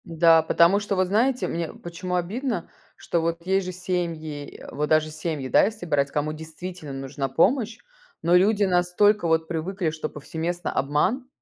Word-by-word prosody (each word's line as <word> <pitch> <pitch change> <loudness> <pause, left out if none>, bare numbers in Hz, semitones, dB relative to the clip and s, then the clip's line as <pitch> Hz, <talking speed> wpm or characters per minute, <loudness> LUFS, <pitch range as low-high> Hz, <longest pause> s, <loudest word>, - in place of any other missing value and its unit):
Н-да, 165 0 +5
потому 170 +4 +4
что, 205 -1 -2
вот 185 -1 +2
знаете, 245 +7 +1
мне 165 -1 -3
почему 175 +1 -5
обидно, 205 +3 -2 0.3
что 170 - -1
вот 170 +1 -2
есть 190 0 +1
же - - -3
семьи, 170 -5 -4
э, - - -10
вот 150 +1 -2
даже 155 0 +3
семьи, 155 -3 -4
да, - - +5
если 215 -3 -4
брать, 140 -4 +1
кому 150 +1 -1
действительно 160 0 -8
нужна 135 0 -4
помощь. 225 - +2 0.5
Но 170 +2 +4
люди 205 +3 +4
настолько 180 +2 +3
вот 160 0 +2
привыкли, 175 +2 -2
что 155 0 -4
повсеместно 165 +4 -4
обман, 180 - 0
170 Hz, 170 wpm, -25 LUFS, 155-190 Hz, 0.5 s, Н-да